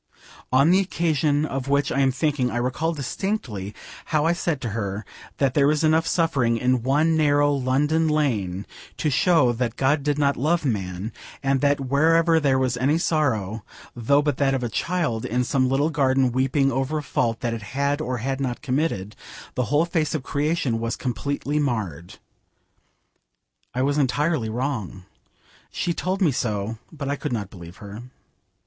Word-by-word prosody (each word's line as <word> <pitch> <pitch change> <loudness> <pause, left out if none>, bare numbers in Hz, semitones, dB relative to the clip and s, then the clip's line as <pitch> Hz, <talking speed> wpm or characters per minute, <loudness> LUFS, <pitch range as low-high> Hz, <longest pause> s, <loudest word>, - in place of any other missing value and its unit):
On 140 +6 +5
the 185 - +5
occasion 155 -5 +1
of 135 -3 -4
which 140 +1 +1
I - - 0
am 135 -1 +3
thinking 140 -2 0
I 120 - -3
recall 130 +7 -1
distinctly 140 - -4 0.3
how 155 -1 +1
I 165 - +3
said 170 -4 -1
to 120 - -3
her 100 -1 -3 0.3
that 135 -3 +1
there 140 -1 +4
was 150 +1 +2
enough 160 +1 +3
suffering 135 -9 +1
in 125 0 +1
one 150 +6 +2
narrow 145 -2 +3
London 145 +4 +1
lane 110 -12 0 0.3
to 150 - 0
show 145 -3 +4
that 120 -1 -2
God 140 +2 +2
did 145 0 0
not 140 -1 +2
love 155 +5 +1
man, 100 -3 -2 0.3
and 135 -1 +1
that 145 0 +2
wherever 160 +5 +3
there 140 -3 +2
was 130 -1 0
any 140 +6 +2
sorrow, 115 - 0 0.3
though 140 +5 +2
but 145 -3 0
that 135 -1 +2
of 130 - -2
a 120 - -1
child, 155 -4 -1
in 125 +2 0
some 130 0 +1
little 140 +4 +1
garden 135 -3 +2
weeping 135 +2 +1
over 135 +4 -1
a 150 - -3
fault 115 -4 -1
that 120 -2 -1
it 115 - -5 0.2
had 140 +1 +1
or 130 -4 -2
had 135 +4 -3
not 125 -3 -3
committed, 125 -8 -1 0.4
the 125 - -1
whole 150 +5 +2
face 165 -2 -1
of 145 - -3
creation 145 -5 0
was 115 +1 -2
completely 140 +3 -2
marred. 100 - -3 1.6
I 130 - +1
was 145 +2 +1
entirely 145 -2 +1
wrong. 110 -6 -3 0.7
She 170 - -1
told 190 +3 -1
me 160 - +4
so, 110 -2 -2
but 145 -4 -6
I 140 - 0
could - - -4
not 105 -5 -3
believe 85 -1 -11
her. 100 +2 -9
135 Hz, 175 wpm, -24 LUFS, 120-150 Hz, 1.6 s, On